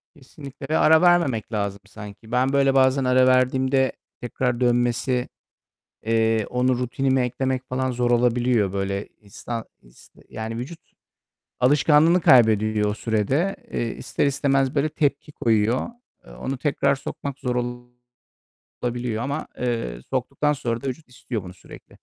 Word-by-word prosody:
Kesinlikle 140 0 -11
ve 160 - +2
ara 160 +1 +5
vermemek 165 - +2
lazım 100 -1 -2
sanki. 105 +2 -11
Ben 130 +2 +1
böyle 135 -1 +3
bazen 130 0 +3
ara 130 0 +4
verdiğimde 130 +1 +2 0.3
tekrar 120 0 -2
dönmesi, 120 +1 +1 0.7
eee, 110 -1 +1
onu 125 0 +1
rutinimi 130 +1 0
eklemek 130 +1 -2
falan 130 0 -1
zor 120 0 -1
olabiliyor. 120 -4 +2
Böyle 100 0 -3
isna 115 +2 -7 0.2
is - - -20 0.2
yani 110 +1 -6
vücut 150 +8 -6 0.8
alışkanlığını 150 +6 +4
kaybediyor 110 -4 +4
o 105 - -1
sürede. 125 - 0 0.2
Eee, 115 -1 -2
ister - - -2
istemez 135 0 +1
böyle 145 +2 +1
tepki 145 -1 -1
koyuyor. 115 - +1 0.4
Eee, - - -14
onu 135 0 -5
tekrar 140 0 +1
sokmak 140 +1 -7
zor 125 -1 -2 1.3
olabiliyor 120 -2 -2
ama, 140 +3 -3
eee, 115 - -3
soktuktan 150 0 0
sonra 120 -4 -3
da 135 - -3
vücut 135 +1 -6
istiyor 120 -4 -6
bunu 90 0 -10
sürekli. 90 - -15
125 Hz, 135 wpm, -23 LUFS, 115-135 Hz, 1.3 s, ara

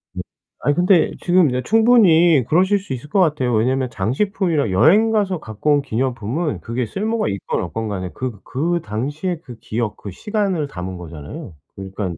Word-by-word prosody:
네. - - -3 0.4
아니 145 +2 +1
근데 180 -1 +3
지금 175 -4 +4
이제 125 +1 -1
충분히 180 - +5
그러실 190 +5 +3
수 185 -8 -6
있을 130 +4 -7
거 195 - +1
같아요. 145 -8 +2
왜냐면 130 +4 +1
장식품이랑 140 - -1
여행 195 - +4
가서 195 -5 0
갖고 110 +4 -1
온 145 - +3
기념품은 130 +4 -2
그게 120 +2 -3
쓸모가 220 - -2
있건 100 -1 -3
없건 110 +5 -4
간에 95 -3 -4
그 120 -1 -5
그 170 +5 -1
당시에 145 - -3
그 120 -3 -11
기억 110 -1 -3
그 100 - -8
시간을 195 - -2
담은 90 -4 -6
거잖아요. 85 - -9 0.2
그러니깐 95 -3 -5
140 Hz, 365 characters per minute, -20 LUFS, 110-180 Hz, 0.4 s, 충분히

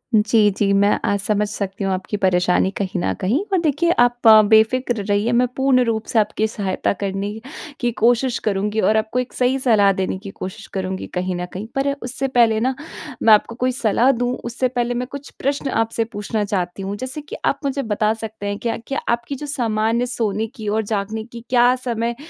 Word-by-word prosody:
जी, 215 0 +4
जी, 200 -1 +2
मैं 200 +1 +4
अ, 200 - +1
समझ 210 +1 0
सकती 200 -1 -4
हूँ 195 - 0
आपकी 190 +3 -3
परेशानी 180 -1 +2
कहीं 190 -2 -2
न - - 0
कहीं, 235 - +1
पर 380 - +3
देखिए, 325 +2 +1
आप 245 -1 +3 0.2
बेफ़िक्र 220 0 +3
रहिए। 205 +3 +1
मैं 245 +1 +3
पूर्ण 265 -1 +3
रूप 220 -1 -1
से 225 - +2
आपकी 215 +1 +1
सहायता 200 -4 -1
करने 200 +1 -3 0.5
की 240 -2 0
कोशिश 240 +2 +3
करुँगी 210 +1 0
और 220 - +3
आपको 220 +3 -1
एक 250 0 -4
सही 255 +2 +1
सलाह 215 -6 +4
देने 190 0 -2
की 200 0 -9
कोशिश 195 +3 -7
करुँगी, 190 -1 -3
कहीं 185 0 -3
न 180 0 -3
कहीं। 205 +4 -6
पर 275 +1 +1
उससे 260 +2 -3
पहले 235 -4 +3
ना, 260 +3 +1 0.5
मैं 220 - +7
आपको 215 +2 +2
कोई 255 +1 0
सलाह 240 +1 +2
दूँ, 245 -1 -1
उससे 245 +2 -1
पहले 245 -1 -1
मैं 250 +1 -3
कुछ 280 0 -8
प्रश्न 275 0 -1
आपसे 225 -1 0
पूछना 210 0 -3
चाहती 185 -2 -3
हूँ, 195 +1 -4
जैसे 260 +6 -5
कि 385 +11 -9
आप - - +1
मुझे 275 0 -1
बता 215 0 +1
सकते 220 -2 -7
हैं 205 0 -2
क्या, 235 - -2
कि 275 +4 -6
आपकी 235 +3 -1
जो 295 +2 -7
सामान्य 230 -3 0
सोने 220 -3 -2
की 220 -3 -7
और 215 +2 +1
जागने 215 +1 -3
की 235 0 -11
क्या 245 0 +4
समय 235 -1 -1
220 Hz, 205 wpm, -20 LUFS, 205-245 Hz, 0.5 s, मैं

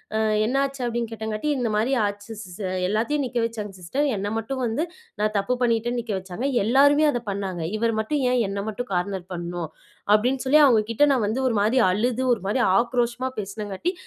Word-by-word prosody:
அ - - +2 0.3
"என்ன 245 +4 -1
ஆச்சு?" 275 -1 -4
அப்படின்னு 235 -1 -2
கேட்டங்காட்டி. 220 +4 -3
"இந்த 245 -3 0
மாரி 220 +5 +1
ஆச்சு 205 +1 -5
ஸ் - - -9
சர். 185 -3 -3
எல்லாத்தையும் 235 +8 0
நிக்க 245 -1 -4
வச்சாங்க 215 -3 -5
சிஸ்டர். 260 +12 -1
என்ன 200 +1 -2
மட்டும் 260 +4 -3
வந்து 235 +7 0 0.4
நான் 215 0 +1
தப்பு 220 +6 0
பண்ணிட்டேன்னு 240 0 +1
நிக்க 225 -2 -4
வச்சாங்க. 190 +7 -4 0.2
எல்லாருமே 285 +7 +5
அத 245 - -2
பண்ணாங்க. 195 -3 -3 0.2
இவர் 230 +1 +1
மட்டும் 275 +7 -1
ஏன் 250 -1 +2
என்னை 200 0 -3
மட்டும் 245 +4 -5
கார்னர் 180 0 -2
பண்ணும்?" 175 -2 -4 0.4
அப்படின்னு 250 +5 +2
சொல்லி 290 +4 +5
அவங்க 235 -6 +5
கிட்ட 260 +6 +4
நான் 245 -5 +1
வந்து 230 +6 -1
ஒரு 235 - 0
மாரி 225 +5 +3
அழுது, 240 +6 0
ஒரு 220 - -4
மாரி 225 +5 +1 0.2
ஆக்ரோஷமா 240 +1 0
பேசுனங்காட்டி, 205 - -3
225 Hz, 190 wpm, -24 LUFS, 205-250 Hz, 0.4 s, எல்லாருமே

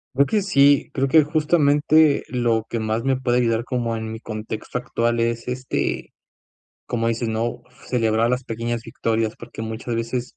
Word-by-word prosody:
Creo 140 +2 +5
que 210 +6 +1
sí. 145 -7 +4
Creo 135 0 +1
que, 155 +3 +6
justamente, 150 -1 +3
lo 120 -3 0
que 115 - -2
más 110 +1 -1
me 135 0 +2
puede 125 -1 +1
ayudar 115 -1 +1
como 120 -2 -2
en 110 0 -5
mi 110 - -6
contexto 110 +1 -5
actual 120 -1 -1
es, 115 0 -1
este, 130 +1 -3 0.7
como 115 -1 -1
dices, 115 0 -1
¿no?, 115 +2 -2 0.3
celebrar 115 -2 +2
las 125 0 -1
pequeñas 115 0 -3
victorias, 115 -2 -1
porque 120 -1 -8
muchas 110 +2 -4
veces, 120 +2 -3
120 Hz, 170 wpm, -22 LUFS, 115-130 Hz, 0.7 s, que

